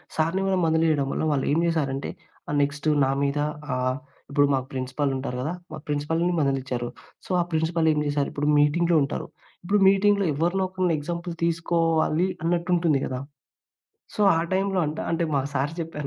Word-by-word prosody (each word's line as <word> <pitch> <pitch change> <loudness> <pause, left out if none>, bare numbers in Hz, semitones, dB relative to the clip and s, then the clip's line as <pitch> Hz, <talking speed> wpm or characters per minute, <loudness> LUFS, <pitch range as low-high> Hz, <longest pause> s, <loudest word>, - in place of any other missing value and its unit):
సార్‌ని 165 +4 +1
కూడా 190 -1 +2
మందలీయడం 160 -3 +2
వల్ల, - - -2
వాళ్ళు 140 -2 0
ఏం 155 - +3
చేశారంటే, 140 -5 -1 0.4
ఆహ్, 145 - -1
నెక్స్ట్ 145 +2 -1 0.2
నా 135 - +2
మీద 140 +1 0 0.4
ఆహ్, 130 0 0 0.3
ఇప్పుడు 145 0 +3
మా 135 - +2
ప్రిన్సిపల్ 130 +2 -2
ఉంటారు 130 -1 -4
కదా! 155 +6 -2 0.2
మా - - -6
ప్రిన్సిపల్‌ని 150 +3 0
కూడ 180 - 0
మందలించారు. 130 -4 -1 0.4
సో, - - -14
ఆ - - +3
ప్రిన్సిపల్ 160 +1 +1
ఏం 150 - 0
చేసారు! 145 -1 0
ఇప్పుడు 145 +1 -1
మీటింగ్‌లో 165 +3 +3
ఉంటారు. 140 - -4 0.4
ఇప్పుడు 200 +4 +2
మీటింగ్‌లో 200 0 +3
ఎవరినో, 175 +6 0
ఒకరిని 185 -3 0
ఎగ్జాంపుల్ 170 +3 -4
తీసుకోవాలి 165 0 +1 0.2
అన్నట్టుంటుంది 170 -3 +1
కదా! 130 0 -4 0.9
సో, - - -4 0.2
ఆ - - +2
టైమ్‌లో 195 0 +1
అంట 150 +1 -4
అంటే 165 0 0
మా 135 - +2
సార్ 140 +4 -1
చెప్పారు 155 -3 -6
160 Hz, 170 wpm, -25 LUFS, 140-170 Hz, 0.9 s, ఏం